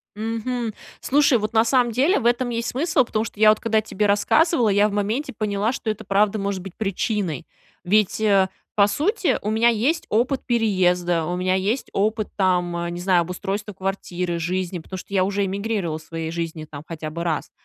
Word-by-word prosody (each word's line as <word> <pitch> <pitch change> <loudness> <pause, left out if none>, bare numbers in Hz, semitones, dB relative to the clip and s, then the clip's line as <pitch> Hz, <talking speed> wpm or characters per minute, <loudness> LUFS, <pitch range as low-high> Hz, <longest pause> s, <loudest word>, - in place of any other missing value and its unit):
Мгм. 225 +1 -3 0.3
Слушай, 285 -2 +3
вот 215 +1 -3
на 220 0 +5
самом 245 -1 +3
деле 275 - +2
в - - -6
этом 245 +1 +2
есть 235 0 -2
смысл, 295 +1 +2
потому 220 -1 -1
что 210 - -10
я 215 0 +7
вот 215 - +4
когда 220 -1 +1
тебе 210 -1 -2
рассказывала, 240 - +3
я 205 +1 +3
в - - -7
моменте 210 +8 -2
поняла, 210 +1 0
что 240 - -4
это 215 - -3
правда 205 +2 +2
может 200 -1 -2
быть 190 -1 -10
причиной. 200 - -2 0.4
Ведь, 205 +3 +2
э, 200 -3 +4 0.3
по 200 -1 +5
сути, 360 - +1
у 210 - -2
меня 225 +2 +4
есть 255 +9 0
опыт 250 +5 +1
переезда, 180 -7 +1
у 175 - -2
меня 185 +1 0
есть 205 +7 -1
опыт, 215 +1 0
там, 175 -3 0
не 175 - -5
знаю, 180 -1 +3
обустройства 195 +4 -4
квартиры, 180 -2 -3
жизни, 180 +1 -2
потому 185 +3 -8
что 190 - -10
я 190 -2 +3
уже 200 +1 0
эмигрировала 195 -4 -2
в - - -15
своей 165 0 -5
жизни 165 -2 -4
там 145 -1 -9
хотя 160 -2 -5
бы 170 +2 -5
раз. 160 -4 -2
205 Hz, 195 wpm, -22 LUFS, 180-225 Hz, 0.4 s, я